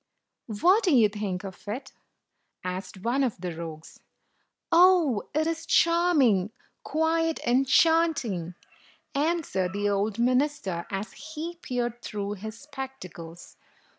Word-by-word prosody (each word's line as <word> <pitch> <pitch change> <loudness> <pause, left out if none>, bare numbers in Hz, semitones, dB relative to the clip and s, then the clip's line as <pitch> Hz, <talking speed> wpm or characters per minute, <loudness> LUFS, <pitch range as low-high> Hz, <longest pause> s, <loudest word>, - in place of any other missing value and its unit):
"What 355 - +3
do 350 -7 +4
you 220 -4 +6
think 200 -3 -4
of 195 +1 -10
it?" 230 +7 -5 0.7
asked 185 +1 -6
one 255 +4 +1
of 240 -7 -1
the 175 -2 -5
rogues. 160 -1 -8 0.7
"Oh, 335 - +5
it 310 +1 +2
is 330 0 -2
charming, 305 - +3 0.3
quite 325 +1 0
enchanting!" 260 - +2 0.6
an 325 +4 +1
swered 185 -7 -2
the 205 +1 0
old 200 +1 0
minister, 250 - 0
as 195 +2 -4
he 315 +3 -7
peered 240 -1 -3
through 205 -1 -4
his 220 +2 -7
spectacles. 260 - -9
240 Hz, 120 wpm, -27 LUFS, 195-315 Hz, 0.7 s, you